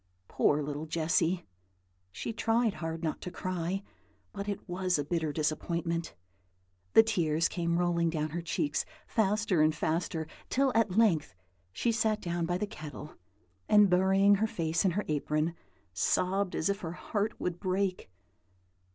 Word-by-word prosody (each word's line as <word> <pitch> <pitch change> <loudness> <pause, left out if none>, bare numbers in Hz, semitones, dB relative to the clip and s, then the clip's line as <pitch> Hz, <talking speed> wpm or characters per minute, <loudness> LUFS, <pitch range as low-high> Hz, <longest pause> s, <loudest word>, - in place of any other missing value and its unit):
Poor 150 0 +2
little 145 +2 -4
Jessy! 165 +2 +1 0.7
she 160 - -5
tried 225 0 +1
hard 165 0 -5
not 155 - -2
to - - -5
cry, 185 +1 -3 0.5
but 200 +1 -4
it 200 - -5
was 180 -1 0
a 145 - -1
bitter 160 0 -1
disappointment; 165 +2 -2 0.8
the 225 - +9
tears 165 -7 +1
came 170 -1 -1
rolling 170 -1 +2
down 155 -1 -1
her 170 +2 -3
cheeks 230 - -1 0.2
faster 210 -5 +1
and 155 0 +3
faster, 160 +1 -1 0.2
till 270 0 +2
at 220 -4 +2
length 165 - +3 0.4
she 230 - 0
sat 220 -1 +1
down 170 -3 -2
by 175 +1 0
the 210 - -1
kettle, 155 -5 -9 0.6
and, 210 -2 +6
burying 190 +2 +5
her 220 - +3
face 165 -5 -1
in 190 - +4
her 200 +3 -2
apron, 155 +2 0 0.4
sobbed 185 - +1
as 160 - 0
if 200 0 0
her 165 -3 -5
heart 210 +4 -2
would 175 -1 -3
break. 185 - -1
175 Hz, 150 wpm, -30 LUFS, 160-200 Hz, 0.8 s, the